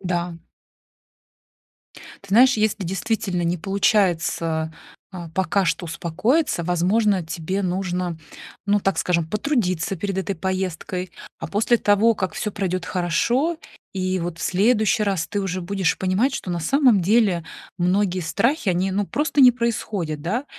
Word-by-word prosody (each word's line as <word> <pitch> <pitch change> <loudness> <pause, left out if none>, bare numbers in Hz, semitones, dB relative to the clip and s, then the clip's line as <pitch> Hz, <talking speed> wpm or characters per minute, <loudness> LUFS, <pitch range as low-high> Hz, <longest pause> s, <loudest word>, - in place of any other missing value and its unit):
Да. 175 -2 -2 1.9
Ты 200 - -15
знаешь, 250 +5 +5
если 215 -1 0
действительно 190 0 -2
не 170 +1 0
получается, 170 -4 0 0.4
э, 175 -3 -7
пока 190 +2 +1
что 175 +2 -1
успокоиться, 180 - 0
возможно, 185 +2 +1
тебе 170 +4 -3
нужно, 180 -2 -2 0.5
ну, 205 0 +3
так 195 -1 0
скажем, 170 -3 0
потрудиться 200 - -1
перед 195 +2 -3
этой 190 +1 -2
поездкой, 185 0 -3 0.3
а 165 - -5
после 220 +7 +2
того, 210 +2 +3
как 185 -4 -3
всё 210 - -3
пройдет 185 -3 -2
хорошо, 235 - 0 0.4
и 185 0 -1
вот 170 -1 -4
в - - -9
следующий 215 +2 +2
раз 190 -5 -1
ты 205 - -2
уже 185 -2 -3
будешь 190 -1 0
понимать, 195 +9 +1
что 180 - -5
на 175 - -2
самом 245 - +3
деле 195 -3 +2 0.3
многие 185 +1 +1
страхи, 230 - 0
они, 185 +2 0
ну, 200 +2 0
просто 295 0 -1
не 250 -1 +9
происходят, 215 -10 -2
да, 220 - -2
190 Hz, 145 wpm, -22 LUFS, 175-210 Hz, 1.9 s, не